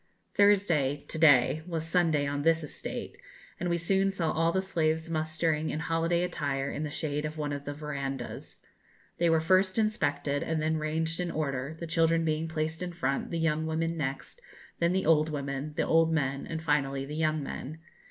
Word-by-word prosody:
Thursday 190 Hz, -9 st, +3 dB
(to 160 Hz, -, -3 dB
day) 145 Hz, -1 st, +5 dB
was 165 Hz, -2 st, -2 dB
Sunday 165 Hz, -4 st, +2 dB
on 145 Hz, 0 st, -2 dB
this 165 Hz, +1 st, +3 dB
estate, 150 Hz, -, -6 dB, 0.4 s
and 175 Hz, -, -1 dB
we 170 Hz, -, +1 dB
soon 195 Hz, +3 st, +2 dB
saw 170 Hz, -5 st, -1 dB
all 165 Hz, +1 st, +2 dB
the 190 Hz, -, +1 dB
slaves 160 Hz, -3 st, 0 dB
mustering 155 Hz, 0 st, 0 dB
in 155 Hz, -, -2 dB
holiday 165 Hz, +2 st, +1 dB
attire 140 Hz, -6 st, -2 dB
in -, -, -4 dB
the 155 Hz, -, -2 dB
shade 150 Hz, 0 st, -2 dB
of 155 Hz, +1 st, -4 dB
one 145 Hz, -1 st, -2 dB
of 145 Hz, 0 st, -5 dB
the 145 Hz, -, -3 dB
verandahs. 140 Hz, -4 st, -5 dB, 0.6 s
They 170 Hz, -, +3 dB
were 165 Hz, 0 st, +4 dB
first 185 Hz, +4 st, +3 dB
inspected, 145 Hz, -10 st, 0 dB
and 160 Hz, -1 st, -1 dB
then 155 Hz, +1 st, +1 dB
ranged 160 Hz, +2 st, -1 dB
in 180 Hz, -1 st, -1 dB
order, 145 Hz, -1 st, -3 dB
the 170 Hz, -, -4 dB
children 165 Hz, 0 st, +2 dB
being 155 Hz, +1 st, 0 dB
placed 160 Hz, +1 st, -3 dB
in 180 Hz, -1 st, -4 dB
front, 140 Hz, -5 st, -1 dB
the 170 Hz, -, -2 dB
young 160 Hz, -1 st, 0 dB
women 165 Hz, +1 st, -1 dB
next, 140 Hz, -, -4 dB, 0.4 s
then 170 Hz, 0 st, +3 dB
the 190 Hz, +1 st, 0 dB
old 155 Hz, 0 st, +4 dB
women, 140 Hz, 0 st, -4 dB
the -, -, +2 dB
old 165 Hz, 0 st, +4 dB
men, 140 Hz, -3 st, -1 dB
and 160 Hz, -1 st, -4 dB
finally 140 Hz, -3 st, 0 dB
the 145 Hz, -, -7 dB
young 155 Hz, -1 st, 0 dB
men. 145 Hz, +2 st, -6 dB
160 Hz, 190 wpm, -29 LUFS, 145-165 Hz, 0.6 s, day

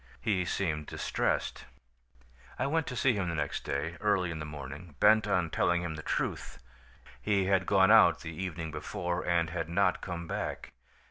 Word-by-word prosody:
He 95 Hz, -5 st, 0 dB
seemed 80 Hz, -5 st, -2 dB
distressed. -, -, -2 dB, 0.9 s
"I 125 Hz, -, 0 dB
went 160 Hz, +2 st, 0 dB
to 125 Hz, -, -4 dB
see 125 Hz, +1 st, +3 dB
him 95 Hz, -5 st, -1 dB
the 85 Hz, -, -2 dB
next 75 Hz, -2 st, -2 dB
day, 80 Hz, +4 st, -3 dB
early 100 Hz, -5 st, +1 dB
in 80 Hz, -, -5 dB
the 75 Hz, -, -5 dB
morning, 75 Hz, +2 st, -8 dB
bent 110 Hz, 0 st, +5 dB
on 90 Hz, -5 st, +1 dB
telling 85 Hz, 0 st, +1 dB
him 85 Hz, -2 st, -3 dB
the 80 Hz, -, -6 dB
truth. -, -, -3 dB, 0.6 s
He 100 Hz, -2 st, +1 dB
had 95 Hz, -1 st, +2 dB
gone 95 Hz, 0 st, +5 dB
out 85 Hz, -8 st, +6 dB
the 80 Hz, -1 st, -6 dB
evening 85 Hz, -2 st, -4 dB
before 90 Hz, +1 st, -3 dB
and 85 Hz, -2 st, +1 dB
had 85 Hz, -2 st, -3 dB
not 90 Hz, +1 st, +2 dB
come 85 Hz, -2 st, -5 dB
back. -, -, -4 dB
85 Hz, 180 wpm, -30 LUFS, 80-100 Hz, 0.9 s, out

